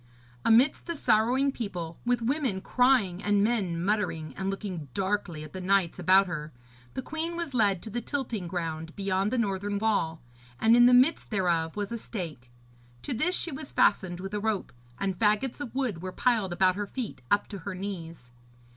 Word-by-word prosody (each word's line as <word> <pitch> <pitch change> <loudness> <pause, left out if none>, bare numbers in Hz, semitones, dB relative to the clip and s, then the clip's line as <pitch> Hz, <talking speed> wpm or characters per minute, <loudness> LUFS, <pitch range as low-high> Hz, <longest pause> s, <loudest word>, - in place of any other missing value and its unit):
Amidst 245 +9 +4
the 340 - -2
sorrowing 255 +2 +3
people, 180 -10 -5
with 245 -1 +2
women 255 -5 0
crying 230 -5 +2
and 205 -1 +3
men 200 -7 0
muttering 185 -7 -1
and 190 0 -2
looking 195 -6 -4
darkly 190 -5 -1
at 155 - -11
the 185 - -5
knights 190 -2 +1
about 190 +1 +5
her, 155 -4 -5 0.4
the 260 - -3
queen 320 +4 -3
was 340 -5 -4
led 200 -7 +2
to 220 - -7
the 240 +3 -2
tilting 235 -8 -3
ground 165 -2 -4
beyond 195 0 0
the 255 - -1
northern 205 -2 -1
wall, 200 -7 0 0.4
and 225 +1 +5
in 240 0 +7
the 250 - +6
midst 265 +6 +4
thereof 170 -6 0
was 205 0 -3
a 235 - -3
stake. 160 - -6 0.5
To - - -2
this 315 +10 +1
she 340 - -1
was 295 +2 -6
fastened 180 -3 +2
with 195 +1 -6
a 210 - 0
rope, 215 -2 -2 0.2
and 195 -2 -2
faggots 215 +6 +1
of 255 -4 -6
wood 245 -11 -1
were 185 0 -4
piled 220 -4 +1
about 185 +1 +3
her 205 0 -3
feet 235 - -5
up 205 - +2
to 200 - -6
her 185 +3 -5
knees. 170 -9 -7
200 Hz, 190 wpm, -28 LUFS, 180-240 Hz, 0.5 s, in